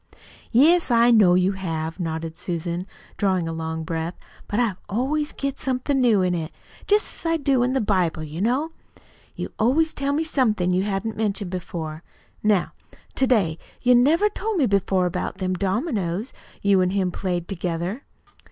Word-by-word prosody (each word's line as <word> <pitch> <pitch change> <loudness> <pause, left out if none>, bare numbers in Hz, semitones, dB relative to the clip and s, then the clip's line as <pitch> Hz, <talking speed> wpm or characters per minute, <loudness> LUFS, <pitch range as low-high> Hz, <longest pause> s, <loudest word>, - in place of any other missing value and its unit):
"Yes, 325 +8 +5
I 235 0 +5
know 200 -6 +6
you 185 +1 +3
have," 165 -3 -4
nodded 160 -1 -3
Susan, 175 +2 -4 0.3
drawing 185 -4 +1
a 165 - -3
long 160 0 -4
breath; 165 +2 -3 0.3
"but 205 - -1
I 235 -5 +2 0.2
always 280 +8 0
get 275 0 -4
somethin' 265 +1 0
new 220 -6 +4
in 180 -1 +1
it, 165 -2 -3 0.4
just 415 +1 +2
as 330 - 0
I 330 - +2
do 275 -4 +2
in 250 +1 +1
the 270 - +1
Bible, 185 -6 +1
you 155 +3 -6
know. 260 +9 +1 0.6
You - - -5
always 310 +8 +3
tell 280 0 -1
me 310 +3 +1
somethin' 215 - +1
you 185 - +2
hadn't 205 +2 -2
mentioned 200 -3 -2
before. 165 -3 -5 0.4
Now, 210 -4 +2 0.4
to 265 - +1
day 190 -11 +2 0.2
you 250 0 +5
never 300 +11 +4
told 420 0 -3
me 290 - +3
before 195 -3 +2
about 180 +1 -3
them 185 -1 -1
dominoes 200 - -1 0.3
you 200 -2 +4
an' 180 - +2
him 190 -1 0
played 175 -2 -3
together." 180 +4 -3
200 Hz, 170 wpm, -23 LUFS, 175-255 Hz, 0.6 s, know